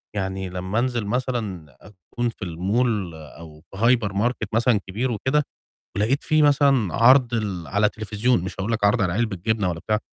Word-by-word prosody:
يعني 95 -1 -3
لمّا 95 +4 -2
أنزل 120 -3 -1
مثلًا 105 - -3
أكون 105 +4 -5
في 110 -3 -8
الmall 95 +2 -1 0.3
أو 80 -2 -12
في 95 - -14 0.2
hypermarket 110 +2 -1
مثلًا 115 -1 +3
كبير 115 +7 -2
وكده 130 +6 +1 0.5
ولقيت 115 +8 +1
في 155 0 +3
مثلًا 140 - +3
عَرْض 125 +1 +5
ال 100 -7 -3
على 105 +5 +2
تليفزيون 110 -1 -1
مش 95 - -5
هاقول 105 +4 -2
لك 110 -2 -1
عَرْض 100 +1 +3
على 90 - 0
علبة 110 0 -1
جبنة 100 +1 0
ولا 85 -1 -5
بتاع، 105 +3 0
105 Hz, 170 wpm, -23 LUFS, 95-120 Hz, 0.5 s, عَرْض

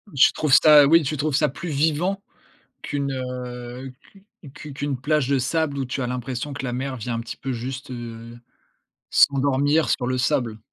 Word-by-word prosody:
Tu 135 - +6
trouves 150 -3 -1
ça 150 -1 +8
oui, 165 +1 +5
tu 150 +2 -2
trouves 150 0 -1
ça 150 -1 +2
plus 170 +5 -7
vivant 160 +7 0 0.6
qu'une, 140 -1 -3
heu, 125 0 -6 0.2
q 195 0 -20 0.3
qu 150 -2 -9
qu'une 140 -1 -3
plage 150 -1 +1
de 140 -1 +2
sable 145 +3 -1
où 135 - -1
tu 130 +2 -4
as - - -1
l'impression 125 +3 -4
que 140 - -6
la 125 - -3
mer 130 +1 -3
vient 120 +1 -4
un 115 - -2
petit 115 - -7
peu, 135 - -4
juste, 130 +2 -6
heu, 115 -1 -8 0.7
s'endormir 140 +3 +3
sur 125 - 0
le 130 0 -1
sable. 120 -5 0
135 Hz, 190 wpm, -23 LUFS, 125-145 Hz, 0.7 s, ça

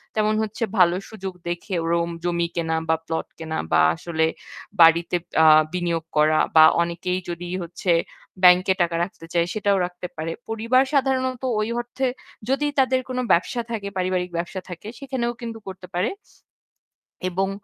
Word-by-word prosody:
তেমন 215 0 +2
হচ্ছে 220 +2 -4
ভালো 175 -1 +5
সুযোগ 195 -3 -6 0.2
দেখে 175 +3 -4 0.2
রোম 170 0 +1
জমি 170 -1 0
কেনা 165 -1 -1
বা 160 - +4
প্লট 160 0 -3
কেনা 160 -1 -4
বা 80 0 +5
আসলে 160 - -1 0.5
বাড়িতে 165 +1 +6 0.3
আ - - +6 0.3
বিনিয়োগ 170 -2 -1
করা। 155 +1 +4 0.2
বা 160 - +9 0.2
অনেকেই 170 +2 -2
যদি 175 +1 -5 0.2
হচ্ছে 175 +1 -2 0.5
ব্যাংকে 180 +1 +6
টাকা 170 -1 +1
রাখতে 175 -2 -7
চায় 170 -1 +2
সেটাও 205 -2 +1
রাখতে 180 0 -7
পারে। 160 +1 -4 0.2
পরিবার 230 +4 +2
সাধারণত 260 -2 +1 0.2
ওই 215 +1 -1
অর্থে 245 +2 -2 0.4
যদি 275 +2 +1
তাদের 260 -1 +3
কোনো 255 0 -1
ব্যবসা 235 +8 +2
থাকে 210 -3 -3
পারিবারিক 180 -1 0
ব্যবসা 175 +2 -4
থাকে 180 +3 -8
সেখানেও 255 -3 -2
কিন্তু 230 -1 -5
করতে 185 -1 -8
পারে। 180 +6 +1 1.2
এবং 190 +2 -1
180 Hz, 155 wpm, -23 LUFS, 170-225 Hz, 1.2 s, বা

